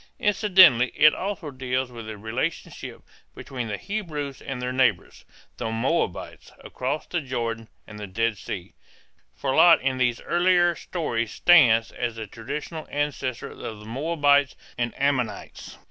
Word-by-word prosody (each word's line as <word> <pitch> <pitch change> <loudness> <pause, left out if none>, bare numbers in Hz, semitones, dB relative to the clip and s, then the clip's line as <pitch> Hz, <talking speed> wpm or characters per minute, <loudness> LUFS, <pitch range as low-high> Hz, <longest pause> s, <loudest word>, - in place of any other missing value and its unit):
Incidentally 185 - +5
it 155 0 +6
also 195 -6 -4
deals 130 -1 -2
with 115 -2 -9
the 110 -1 -7
relationship 120 +10 -5 0.3
between 125 -3 -6
the 105 -1 -3
Hebrews 155 -10 -5
and 135 -2 -5
their 125 0 -3
neighbors, 125 -10 0 0.3
the - - -3
Moabites, 115 - -2
across 135 +4 -3
the 175 - -2
Jordan 115 -4 -4 0.2
and 105 -1 -11
the 105 - -6
Dead 110 +2 -1
Sea, 90 -1 -7 0.6
for 135 -1 -2
Lot 170 +3 +7
in 130 -1 -1
these 120 -2 +1
earlier 175 0 +3
stories 120 -10 -3
stands 120 -10 +5
as 120 -2 -3
the 110 -1 -5
traditional 145 - -6
ancestor 140 -4 -3
of - - -13
the 105 -1 -7
Moabites 145 +2 +2 0.2
and 120 0 -1
Ammonites. 130 -7 -2
130 Hz, 145 wpm, -25 LUFS, 115-155 Hz, 0.6 s, Lot